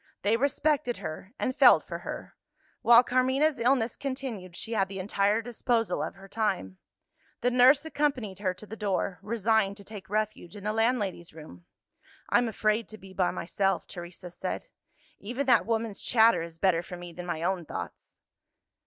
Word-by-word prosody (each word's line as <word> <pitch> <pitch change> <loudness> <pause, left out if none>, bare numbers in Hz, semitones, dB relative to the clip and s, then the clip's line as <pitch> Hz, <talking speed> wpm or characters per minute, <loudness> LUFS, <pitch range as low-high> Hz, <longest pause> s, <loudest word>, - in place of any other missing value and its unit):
They 205 +3 +3
respected 280 0 +1
her, 175 +5 -7
and 255 - -1
felt - - +7
for - - -6
her: - - -7 0.5
while 235 +1 +7
Carmina's 260 +3 +2
illness 235 -1 +2
continued, 260 -10 -5
she 225 - -6
had 195 -3 +2
the 195 - -6
entire 200 +3 +1
disposal 235 -1 0
of - - -4
her 195 0 -13
time. 95 - -2 0.6
The 245 - +2
nurse 260 +4 +6
accompanied 275 - -1
her 190 -2 0
to 215 - -11
the 215 - -8
door; 195 -3 -1
resigned 215 -1 +1
to 200 - -11
take 195 -3 -10
refuge 215 -4 -2
in 205 - -9
the 210 +1 -1
landlady's 215 -7 0
room. 90 - -12 0.6
"I'm 245 0 +3
afraid 215 +1 0
to 215 - -9
be 190 -2 -13
by 185 -2 +1
myself," 195 +2 -1
Teresa 175 0 -9
said. - - -4 0.6
"Even 245 +7 -3
that 240 -5 +4
woman's 225 -3 -1
chatter 230 -4 +4
is 165 0 -7
better 175 -2 +2
for 180 +1 -9
me 175 -1 -9
than 180 +1 -8
my 165 -2 -3
own 180 0 0
thoughts." - - -8
215 Hz, 170 wpm, -28 LUFS, 185-240 Hz, 0.6 s, felt